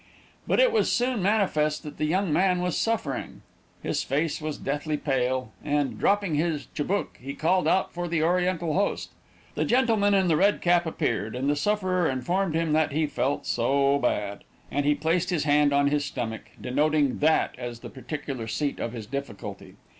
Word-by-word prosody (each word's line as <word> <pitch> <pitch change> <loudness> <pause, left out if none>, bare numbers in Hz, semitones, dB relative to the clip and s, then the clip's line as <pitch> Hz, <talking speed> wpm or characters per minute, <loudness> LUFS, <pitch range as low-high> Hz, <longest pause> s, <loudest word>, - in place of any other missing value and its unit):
But - - +2
it - - +5
was 450 - +2
soon 245 -3 +1
manifest 180 -7 +1
that 150 - -8
the 155 - +1
young 180 +1 +1
man 180 0 +3
was 180 -1 -1
suffering. 220 - -2 0.4
His - - -1
face 150 +4 -1
was 155 -1 -3
deathly 150 +2 -2
pale, 130 -4 -1
and, 145 -6 -1
dropping 200 -4 +2
his 150 -2 0
chibouk, 190 +7 -2
he 135 +2 -7
called 180 +4 +2
out 190 - +2
for 175 0 -3
his 160 -2 +1
oriental 175 -1 +1
host. 200 +4 -1 0.4
The - - -1
gentleman 225 -5 +3
in 190 -2 +3
the 165 - +3
red 200 +5 +3
cap 175 -1 +2
appeared, 110 -8 -2
and 130 +2 -2
the 145 - +2
sufferer 185 0 +1
informed 160 +7 -1
him 165 -2 +1
that 155 -1 +2
he 155 +2 +1
"felt 145 -1 -1
so 140 +4 +2
bad," 105 -5 -1 0.3
and 145 0 0
he 150 - +4
placed 170 +4 0
his 175 -5 0
hand 145 0 +3
on 140 0 +3
his 145 0 +1
stomach, 120 -6 -4
denoting 145 +1 +1
that 155 +2 +3
as 120 -1 -6
the - - -8
particular 135 -3 -5
seat 145 +5 -2
of 115 - -3
his 115 -3 -6
difficulty. 135 -4 -7
155 Hz, 185 wpm, -26 LUFS, 140-180 Hz, 0.4 s, it